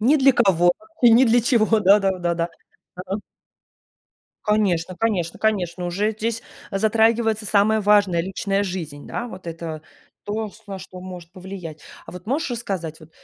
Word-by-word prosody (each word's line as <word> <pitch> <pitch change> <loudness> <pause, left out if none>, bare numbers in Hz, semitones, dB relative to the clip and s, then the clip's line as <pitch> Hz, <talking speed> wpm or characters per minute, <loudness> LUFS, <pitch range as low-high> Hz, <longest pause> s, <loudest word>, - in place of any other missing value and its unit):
Ни 270 +8 +4
для 270 -1 +5
кого 175 -5 +4 0.3
и 240 - +8
ни 240 +4 +7
для 235 +1 +4
чего. 225 -3 +3
Да, 200 +1 +6
да, 190 -1 0
да, 175 -1 0
да. 170 0 -1 0.5
Да. 185 +2 -4 1.3
Конечно 190 -5 +1
конечно 185 -7 -1
конечно. 180 -5 0
Уже 200 +5 0
здесь 225 +1 -3 0.3
затрагивается 220 +1 +2
самое 215 +2 +3
важное- 205 -4 +4
личная 195 +2 -1
жизнь, 165 -7 -5
да? 240 - -4
Вот 185 -6 -10
это 165 -2 -6 0.4
то, 215 +1 -3
ш - - -20
на 195 -1 -6
что 185 0 -10
может 180 -2 -9
повлиять. 185 -4 -8 0.3
А - - -9
вот 180 +2 -10
можешь 280 +4 -1
рассказать 190 -10 -4
вот, 155 0 -15
195 Hz, 165 wpm, -22 LUFS, 175-220 Hz, 1.3 s, и